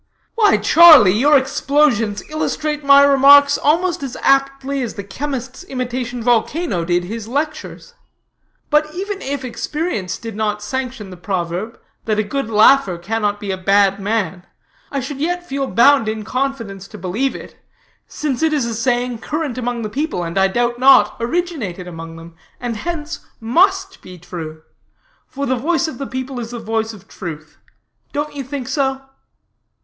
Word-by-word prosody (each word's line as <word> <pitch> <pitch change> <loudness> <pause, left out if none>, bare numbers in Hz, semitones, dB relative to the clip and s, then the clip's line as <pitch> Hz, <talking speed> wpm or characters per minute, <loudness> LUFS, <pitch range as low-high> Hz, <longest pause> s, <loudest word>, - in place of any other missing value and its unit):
"Why 425 -3 +4
Charlie, 310 - +8
your 290 +6 +5
explosions 265 -5 +1
illustrate 305 -1 -2
my 280 0 +7
remarks 280 +1 +6
almost 340 +3 +1
as 265 -3 -5
aptly 275 0 +1
as 240 - -4
the 200 - -6
chemist's 260 - -5
imitation 250 -3 -4
volcano 240 - 0
did 175 +1 0
his 220 +4 -6
lectures. 305 - -4 0.8
But 300 +1 +2
even 395 +2 -4
if 275 -1 -4
experience 250 - -3
did 225 -2 -8
not 210 -1 -2
sanction 255 -4 -5
the 180 - -10
proverb, 185 +3 -4 0.3
that 215 -1 0
a 215 - +2
good 270 +3 -3
laugher 215 -3 +4
cannot 205 +3 -2
be 205 -2 -4
a 190 - -2
bad 195 +1 +3
man, 195 -4 -2 0.5
I 275 - -2
should 270 +2 -6
yet 350 +2 -1
feel 275 0 -2
bound 235 +3 +4
in 220 0 -4
confidence 230 -7 -3
to 215 - -11
believe 205 +9 -2
it, - - -10 0.5
since 290 -4 -3
it 320 -1 +2
is 285 -5 +1
a 235 - -3
saying 245 +1 -1
current 295 -1 -3
among 245 -1 -3
the - - -2
people, 275 - -3
and 170 0 -5
I 195 0 +4
doubt 240 +4 -1
not 255 -5 +6
originated 235 - -3
among 165 -1 -8
them, 165 0 -12 0.3
and 240 -2 -3
hence 320 +5 -5 0.2
must 380 - +1
be 180 -1 -12
true; 160 -2 -8 0.6
for 280 +1 -4
the 260 - +1
voice 330 +6 0
of 285 -6 -7
the 275 - -4
people 260 0 -5
is 230 -1 -6
the 240 0 -6
voice 225 0 -2
of 200 -3 -14
truth. 155 -3 -9 0.5
Don't 295 +1 -3
you 280 - -4
think 265 -1 -6
so?" 270 0 -1
245 Hz, 165 wpm, -18 LUFS, 210-285 Hz, 0.8 s, Charlie